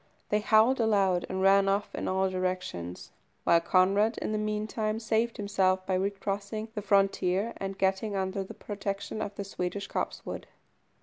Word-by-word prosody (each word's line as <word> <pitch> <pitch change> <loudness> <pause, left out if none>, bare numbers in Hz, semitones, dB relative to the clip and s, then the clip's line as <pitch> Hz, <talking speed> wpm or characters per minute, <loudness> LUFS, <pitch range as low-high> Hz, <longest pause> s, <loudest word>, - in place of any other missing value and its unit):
They 210 - +2
howled 220 +5 +4
aloud 200 -5 +2
and 190 0 -2
ran 195 0 +5
off 200 +1 0
in - - -3
all 190 +1 +2
directions, 185 - -3 0.3
while 170 0 +5
Conrad 195 +6 +3
in - - -3
the 215 - 0
meantime 215 +1 -1
saved 225 +1 0
himself 190 -2 +1
by 190 - -1
recrossing 200 +3 -2
the 210 - -3
frontier, 195 +1 +2
and 195 0 -4
getting 195 +2 0
under 190 0 -1
the 190 - -10
protection 200 +1 -4
of 205 -1 -4
the 200 - -4
Swedish 195 +1 -4
copsewood. - - -4
200 Hz, 160 wpm, -29 LUFS, 190-215 Hz, 0.3 s, ran